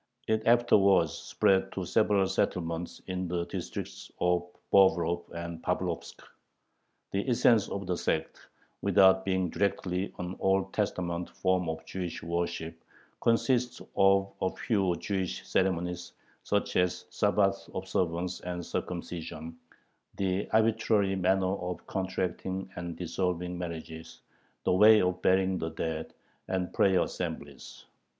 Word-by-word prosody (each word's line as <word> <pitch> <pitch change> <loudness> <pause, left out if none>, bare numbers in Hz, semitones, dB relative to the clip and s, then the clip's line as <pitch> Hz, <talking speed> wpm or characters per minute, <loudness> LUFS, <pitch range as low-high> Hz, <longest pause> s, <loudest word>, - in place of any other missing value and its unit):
It 110 0 0
afterwards 100 -8 +5
spread 95 0 +1
to 95 - -3
several 100 +1 +3
settlements 85 -3 -2
in 95 -1 -3
the 85 0 -1
districts - - -6
of 90 0 +2 0.3
Bobrov 85 -3 +4
and 85 -1 -6
Pavlovsk. - - -3 0.9
The 100 +6 -1
essence 115 -3 +4
of 100 0 -4
the 90 - -1
sect, 80 -2 -2 0.4
without 95 -1 +5
being 95 -2 0
directly 95 -1 -1
an 90 +1 -4
Old 95 0 +1
Testament 90 -4 -2
form 95 -2 0
of 80 0 -5
Jewish 90 -4 -5
worship, 85 -1 -3 0.4
consists 125 +1 +2 0.2
of 95 0 +4
a 95 - +2
few 95 -6 0
[Jewish] 95 0 -3
ceremonies, 90 -1 -1 0.3
such - - 0
as 90 0 +1
Sabbath 100 -2 +1
observance 90 -1 -1
and 90 -1 -5
circumcision, 85 -2 -5 0.6
the 95 0 -1
arbitrary 110 -3 +2
manner 95 0 +2
of 90 0 -5
contracting 95 0 -3
and 85 -1 -5
dissolving 90 +1 -2
marriages, 85 -1 -7 0.4
the - - +2
way 105 +3 +7
of 90 -1 0
burying 95 0 +3
the 80 - -2
dead, 80 0 -4 0.3
and 95 -1 -2
prayer 95 -2 +4
assemblies. - - -6
95 Hz, 120 wpm, -29 LUFS, 85-95 Hz, 0.9 s, way